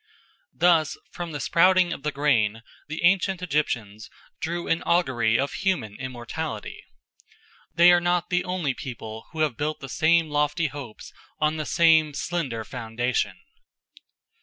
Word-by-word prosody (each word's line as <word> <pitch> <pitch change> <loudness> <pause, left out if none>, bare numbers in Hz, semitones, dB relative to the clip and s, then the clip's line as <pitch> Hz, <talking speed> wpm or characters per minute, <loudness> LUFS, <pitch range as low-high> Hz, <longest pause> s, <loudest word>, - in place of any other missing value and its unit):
Thus 165 -3 +3
from 175 -2 -6
the 145 - -5
sprouting 180 +3 +4
of - - -8
the 150 - -2
grain 115 -7 +1 0.2
the 155 +2 -5
ancient 185 0 +2
Egyptians 115 - -2 0.3
drew 170 +1 -3
an 165 - +1
augury 120 -10 +2
of 140 +1 -1
human 180 - -1
immortality. 125 -3 -6 0.9
They 170 +2 +7
are 175 0 +4
not 175 0 0
the 180 0 +2
only 180 -7 -1
people 110 -4 -8
who 160 - -4
have 150 -7 0
built 155 +1 -2
the 135 - -8
same 160 +4 +3
lofty 150 +3 +1
hopes 140 -6 -9 0.2
on 155 +1 0
the 155 - -4
same 160 -3 +4
slender 140 -10 -3
foundation. 120 +1 -2
150 Hz, 140 wpm, -25 LUFS, 125-175 Hz, 0.9 s, They